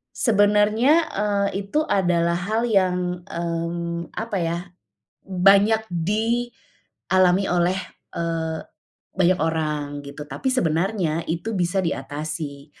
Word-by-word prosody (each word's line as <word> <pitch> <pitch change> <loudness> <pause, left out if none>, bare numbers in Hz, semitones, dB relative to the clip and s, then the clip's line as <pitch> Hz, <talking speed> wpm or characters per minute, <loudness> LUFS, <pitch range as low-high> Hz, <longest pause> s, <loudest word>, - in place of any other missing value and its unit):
Sebenarnya, 215 +7 +3
eee, 200 -1 -1
itu 200 +10 -1
adalah 170 -3 +2
hal 215 +7 -1
yang, 180 -3 +1
mmm, 170 0 -3
apa 220 -3 -3
ya, 165 +1 -1 0.7
banyak 200 +4 +4
dialami 200 -1 0
oleh, 180 +1 +1 0.4
eee, 165 -1 -2 0.6
banyak 185 0 +3
orang 150 -3 -2
gitu 145 +1 -9
tapi 145 - -2
sebenarnya 170 -5 0
itu 170 +7 -3
bisa 180 0 0
diatasi, 145 -2 -4
180 Hz, 100 wpm, -23 LUFS, 165-205 Hz, 0.7 s, banyak